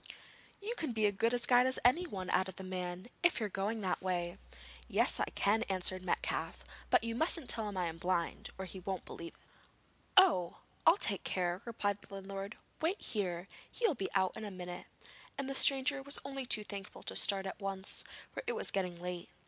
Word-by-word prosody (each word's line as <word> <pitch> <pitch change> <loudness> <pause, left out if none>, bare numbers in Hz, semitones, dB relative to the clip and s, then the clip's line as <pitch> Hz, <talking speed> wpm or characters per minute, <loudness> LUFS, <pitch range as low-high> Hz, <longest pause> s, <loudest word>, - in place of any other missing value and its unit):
'You 425 +4 -3
can 305 -7 -1
be 220 -1 +2
as 205 - +3
good 225 +4 +2
a 245 - +2
guide 245 +1 +5
as 260 - +2
anybody,' 245 - +2
added 185 0 +1
the 190 - -5
man, 185 +1 -4
'if 345 -5 +4
you 220 - 0
are - - -3
going 205 +3 -1
that 185 -2 -1
way.' 175 -2 -1 0.5
'Yes, - - +3
I - - +2
can,' 210 +3 +3
answered 185 0 +1
Metcalfe; 185 - -1 0.3
'but - - +5
you 230 0 -1
mustn't 315 +2 +1
tell 220 -2 +2
him 200 - -6
I 180 - +1
am 165 0 -4
blind, 175 -1 -1
or 190 - -4
he 190 +1 -7
won't 190 0 -4
believe 170 - -8
it.' - - -25 0.8
'Oh! 305 - +6 0.3
I'll 335 - +8
take 200 - 0
care,' 180 -1 0
replied 205 -3 -1
the - - -17
landlord. 195 +1 -6 0.2
'Wait 345 +6 +1
here! 185 -4 -2 0.2
he 480 - -1
will 375 - +5
be 195 -8 -3
out 190 -1 +3
in 220 - -6
a 210 - -4
minute,' 180 -2 -7 0.5
and 275 -1 -2
the 275 - -2
stranger 275 +1 +5
was 280 +1 0
only 270 -2 -4
too 215 -3 +3
thankful 200 -2 -7
to - - -2
start 195 -1 +2
at 190 - -5
once, 195 -1 -2 0.3
for - - -4
it - - +1
was - - -1
getting 180 -3 -1
late. 180 0 -5
195 Hz, 210 wpm, -34 LUFS, 185-245 Hz, 0.8 s, I'll